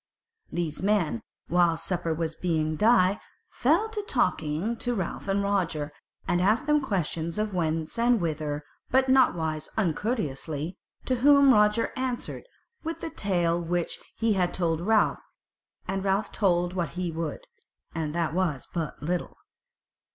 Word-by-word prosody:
These 165 -3 -2
men, 190 - +1 0.3
while 175 -1 +3
supper 175 -1 -1
was 160 0 -1
being 155 -2 -1
dight, 210 0 +4 0.3
fell 440 - +2
to 435 -1 -3
talking 195 - 0
to 245 +1 -1
Ralph 190 -1 -4
and 195 +1 +1
Roger, 170 -7 0 0.4
and 175 - +2
asking 215 +9 +3
them 300 0 +3
questions 170 - -2
of 215 -1 -1
whence 165 +3 -1
and 240 0 +4
whither, 155 -3 -2 0.3
but 265 0 +3
nowise 160 -12 +2
uncourteously: 165 - -1 0.3
to 255 - +1
whom 280 +1 +6
Roger 210 +1 +3
answered 255 - -3 0.4
with 325 +1 -4
the 325 - -4
tale 175 -4 0
which 175 0 -2 0.2
he 225 -1 +2
had 180 -2 0
told 165 -2 0
Ralph, 215 +3 +2 0.7
and 195 0 -2
Ralph 200 +2 0
told 175 -3 +1
what 175 -3 -2
he 180 -2 -1
would, 160 -2 -4 0.5
and 160 -1 -3
that 165 -2 0
was 170 -7 -1
but 165 -4 -4
little. 175 +3 -2
180 Hz, 145 wpm, -27 LUFS, 160-215 Hz, 0.7 s, whom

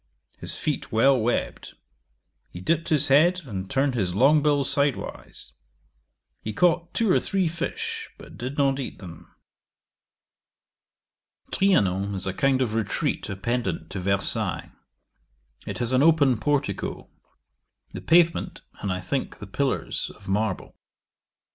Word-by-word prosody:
His - - -3
feet - - -3
well 135 +5 +5
webbed: 120 0 -2 0.7
he 90 - -9
dipped 165 - 0
his 150 -2 +2
head, 170 +7 +4
and 95 -6 -6
turned 135 0 +1
his 95 -7 -1
long 145 +7 +5
bill 145 -1 +2
sidewise. 140 0 -2 0.9
He 110 - -5
caught 175 +5 +2
two 225 -4 +2
or - - +4
three 190 -3 0
fish, 170 +1 -4
but - - -13
did 130 +3 -6
not 140 -1 +2
eat 135 - -5
them. 85 -4 -12 2.2
'Trianon 100 - +2
is 95 - +1
a 95 - -2
kind 130 +4 +2
of 110 -4 -3
retreat 110 -2 -1
appendant 120 +5 -3
to 95 - -4
Versailles. 100 +1 0 1.0
It - - -4
has 120 0 0
an 130 - +4
open 145 -6 +4
portico; 140 -5 -2 0.9
the - - -6
pavement, 170 0 +2 0.2
and, 100 - -2
I 90 0 -3
think, 130 +10 -3
the 105 - -9
pillars, 135 +7 -2
of 100 - -17
marble. 105 0 -2
130 Hz, 135 wpm, -25 LUFS, 100-150 Hz, 2.2 s, well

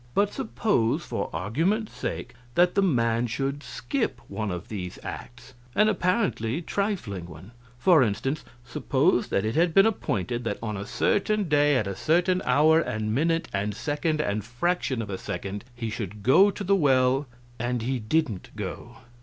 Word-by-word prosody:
But 200 0 +2
suppose, 215 - 0
for - - -3
argument's 165 - -1
sake, 125 - -5 0.2
that 175 0 +4
the 200 - +3
man 120 -9 +2
should 135 +4 -2
skip 225 - -3
one 110 -1 -3
of 90 -2 -5
these 90 -5 -6
acts; 120 +2 -8 0.2
an 215 +1 +5
apparently 180 - 0
trifling 175 - -3
one, 85 +5 -12 0.3
for 160 +4 +5
instance; 130 +6 0 0.2
suppose 120 - +1
that 100 - 0
it 110 - -1
had 165 +2 +2
been 195 - +7
appointed 120 - -1
that 115 - -2
on 110 -2 -4
a 100 +1 -5
certain 210 -1 +1
day, 145 -1 +4
at 110 - +1
a 100 0 -4
certain 180 +3 +2
hour 150 +5 +5
and 110 -8 -2
minute 165 +5 +1
and 100 +1 -1
second 150 +4 -1
and 105 -6 -1
fraction 130 - -1
of 100 - -7
a 95 - -4
second 100 +1 -5
he 115 -2 -4
should 105 -2 -6
go 190 - +6
to 200 - -5
the 200 +1 +3
well, 135 -4 +3 0.3
and 120 0 -1
he 130 +1 -1
didn't 115 - -1
go. - - -6
130 Hz, 170 wpm, -26 LUFS, 110-175 Hz, 0.3 s, been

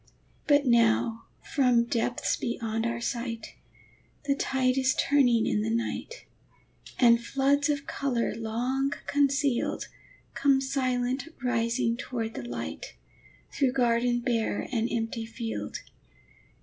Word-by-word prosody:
But 290 -1 +4
now 230 -1 +3 0.2
from 250 -4 +3
depths 235 +1 0
beyond 225 -2 -2
our 235 0 -2
sight, 235 -2 -4 0.7
The 280 - +2
tide 260 -2 +1
is 260 -1 +2
turning 245 -6 +3
in 210 - +1
the 220 - -1
night, 235 - -3 0.7
And 235 -2 +5
floods 280 +3 +1
of 285 -1 -1
color 255 -4 -1
long 245 +5 -1
concealed 280 -2 +1 0.4
Come 275 -1 +3
silent 260 0 -1 0.2
rising 235 0 +1
toward 230 -4 -4
the - - -5
light, 240 - -6 0.6
Through 265 -3 +1
garden 240 -1 +2
bare 230 -4 -1
and 230 -1 0
empty 225 0 -2
field. 225 0 -5
245 Hz, 115 wpm, -28 LUFS, 230-270 Hz, 0.7 s, And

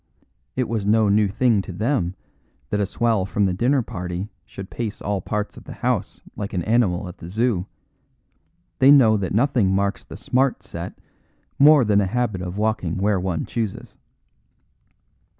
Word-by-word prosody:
It 130 -2 0
was 110 -3 -2
no 105 +1 +3
new 105 +1 +3
thing 110 +1 +2
to 95 - -8
them 100 -2 -1 0.6
that 105 - 0
a 100 - +1
swell 115 -1 +1
from 100 +2 0
the 95 - +1
dinner 125 +7 +2
party 90 +1 -5 0.2
should 95 -2 -9
pace 110 -3 -4
all 100 -1 -2
parts 105 +2 -3
of - - -12
the - - -8
house - - -2
like 100 -1 -5
an 90 -3 -1
animal 105 -4 +1
at 90 - -10
the 85 - -9
Zoo; 105 -2 0 1.1
they 130 - +6
know 130 -7 +7
that 100 -4 -2
nothing 120 -5 +2
marks 100 +1 0
the - - -10
Smart 130 +1 0
Set 85 +2 -7 0.6
more 145 -2 +7
than 105 -1 +3
a 95 - 0
habit 105 -3 -1
of 90 +1 -5
walking 105 -6 -1
where 100 0 +1
one 90 -3 -2
chooses. 110 -5 -5
105 Hz, 170 wpm, -22 LUFS, 95-115 Hz, 1.1 s, know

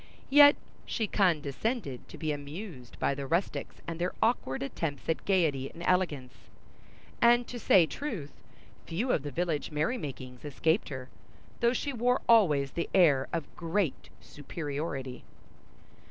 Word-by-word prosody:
Yet 290 0 +9 0.3
she 225 - -1
condescended 175 - 0
to - - -10
be 155 -2 -2
amused 145 - -7
by - - +1
the 140 0 -5
rustics 170 +6 -1
and 165 0 -5
their 180 +1 -1
awkward 220 - 0
attempts 145 0 -4
at 160 - -1
gaiety 155 -9 +1
and 170 - -10
elegance; 155 -9 0 0.9
and, 240 +1 +5
to 245 - -6
say 185 -6 +5
truth, 190 - -5 0.5
few 220 +10 -1
of - - +2
the 145 - -5
village 160 +1 -2
merry 155 +12 -1
makings 130 - -7
escaped 160 +5 0
her, 130 -2 -7 0.5
though 235 +1 +3
she 285 +2 -2
wore 250 +1 +1
always 150 - +4
the 170 - -3
air 145 -8 +5
of 165 -3 -4
great 170 -2 -1
superiority. 145 -4 -5
165 Hz, 140 wpm, -30 LUFS, 140-205 Hz, 0.9 s, Yet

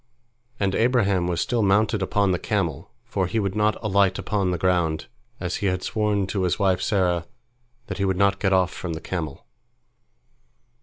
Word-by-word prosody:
And 100 -1 +1
Abraham 100 -7 +2
was 85 -1 -1
still 120 -4 0
mounted 105 +1 +2
upon 100 +1 +1
the 90 - 0
camel, 85 -9 -2 0.2
for 95 -2 -1
he 110 - -1
would 100 -3 -1
not 105 0 +2
alight 100 -2 +2
upon 100 -3 -1
the 90 - 0
ground, 85 -3 +1 0.3
as 90 0 -2
he 100 - -1
had 95 -1 -1
sworn 105 -3 0
to 95 +1 -2
his 90 -1 +1
wife 95 -3 +2
Sarah 90 -5 +1 0.6
that - - -6
he 100 - +1
would 95 -1 0
not 100 0 +2
get 95 - +1
off 95 -2 +2
from 85 -2 -5
the 80 - -5
camel. 80 -7 -5
95 Hz, 185 wpm, -24 LUFS, 90-105 Hz, 0.6 s, Abraham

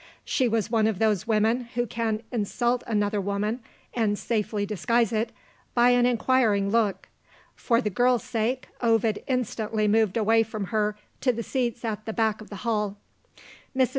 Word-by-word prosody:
She 255 - +1
was 225 -1 0
one 220 -2 +3
of 220 -4 0
those 215 -1 +1
women 225 +3 +2
who 240 0 +1
can 225 -1 -2
insult 240 +2 0
another 205 -2 0
woman 200 +4 -1 0.3
(and 215 -3 +1
safely 210 -2 -1
disguise 230 +3 +1
it) 225 +1 0 0.4
by 245 0 +5
an 245 0 +4
inquiring 225 -5 +2
look. 220 -3 +1 0.5
For 235 -1 +1
the 210 - -2
girl's 245 +4 +2
sake, 240 +3 -2
Ovid 225 -2 +2
instantly 220 -4 -1
moved 220 -1 +2
away 225 +1 +4
from 215 -2 -3
her 210 -1 +1 0.2
to 255 - +2
the 230 -1 -4
seats 240 -2 -2
at 215 -1 -3
the 220 - -2
back 220 -1 0
of 215 - -12
the 205 - -7
hall. 210 -3 0 0.8
Mrs. 260 -2 +4
225 Hz, 165 wpm, -26 LUFS, 210-240 Hz, 0.8 s, by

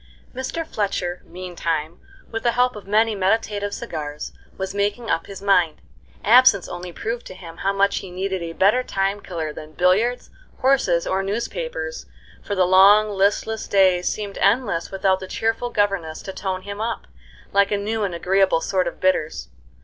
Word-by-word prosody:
Mr. 260 +6 -4
fletcher, 195 - -2
meantime, 170 -3 -4 0.3
with 225 0 -3
the 240 -1 +1
help 250 0 +2
of 205 -2 -10
many 220 +2 +3
meditative 205 +1 0
cigars, 150 -10 -5 0.3
was 190 0 -4
making 205 +3 -1
up 165 0 -1
his 195 -1 -9
mind. 180 -6 +3 0.4
Absence 235 -4 +6
only 175 0 -7
proved 230 +7 -4
to 185 - -9
him 170 -3 -11
how 195 - 0
much 200 0 +2
he 190 - -5
needed 190 +1 -3
a 165 -1 -5
better 205 +8 +3
time 195 -3 -1
killer 160 -4 -4
than 155 +1 -10
billiards, 200 +9 +1 0.3
horses, 255 -11 +3
or 190 +1 0
newspapers, 485 - -4 0.3
for 205 - -3
the 185 -1 +3
long, 200 +3 +6
listless 205 +2 0
days 185 -2 +3
seemed 205 -2 -5
endless 200 -5 +1
without 190 -1 +1
the 190 - -7
cheerful 225 +4 -1
governess 195 -8 -1
to 190 - -6
tone 185 -1 -3
him 200 +1 -6
up, 230 +1 -3 0.5
like 200 0 +4
a 205 - +2
new 215 +2 -2
and 185 -4 -2
agreeable 190 0 +2
sort 185 +1 0
of 170 - -6
bitters. 175 -4 0
195 Hz, 170 wpm, -22 LUFS, 180-215 Hz, 0.5 s, Absence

